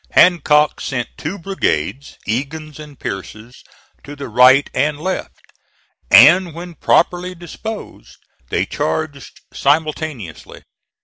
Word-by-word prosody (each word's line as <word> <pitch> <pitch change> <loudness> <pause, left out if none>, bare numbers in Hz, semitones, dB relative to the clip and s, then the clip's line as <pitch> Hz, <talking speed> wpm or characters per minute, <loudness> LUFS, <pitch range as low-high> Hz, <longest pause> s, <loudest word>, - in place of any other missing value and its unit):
Hancock 150 -4 +4
sent 120 -4 -3
two 175 +7 -5
brigades, 140 - -3
Egan's 150 +7 -4
and 150 -3 -12
Pierce's, 110 +5 -8 0.4
to 145 - -9
the 140 -3 -7
right 130 +5 +5
and 150 +1 0
left, 185 +4 -4 0.7
and 165 +6 +7
when 175 +1 -8
properly 180 +2 +1
disposed 180 +6 -9 0.3
they - - 0
charged 155 -3 -4
simultaneously. 150 - -2
150 Hz, 105 wpm, -18 LUFS, 130-170 Hz, 0.7 s, and